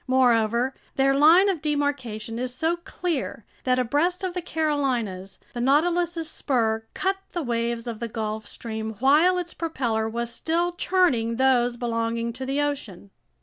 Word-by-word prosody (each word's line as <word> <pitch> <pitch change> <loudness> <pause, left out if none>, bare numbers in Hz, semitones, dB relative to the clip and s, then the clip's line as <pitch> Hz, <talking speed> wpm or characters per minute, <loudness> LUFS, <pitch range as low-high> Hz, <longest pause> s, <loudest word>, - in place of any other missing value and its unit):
Moreover, 245 -1 +3 0.2
their 270 0 +3
line 320 +8 +6
of 370 -6 0
demarcation 270 -7 -2
is 250 0 -3
so 320 +5 +1
clear 340 - -4 0.2
that 255 -1 +3
abreast 295 +10 +1
of 370 -1 -2
the 360 - -3
Carolinas, 260 - -1 0.2
the 240 - -3
Nautilus's 330 +5 +2
spur 225 -7 -1
cut 385 +1 0 0.2
the 345 - -2
waves 235 -1 -1
of 230 -3 -5
the 235 - -3
Gulf 220 -1 -4
Stream 220 -1 -5
while 305 - +4
its 350 -1 -4
propeller 235 -9 -1
was 235 +1 -3
still 340 +7 0
churning 340 -11 +1
those 245 -1 +3
belonging 230 -1 -1
to 260 +2 -6
the 275 +2 0
ocean. 250 -10 -3
255 Hz, 150 wpm, -25 LUFS, 230-320 Hz, 0.2 s, line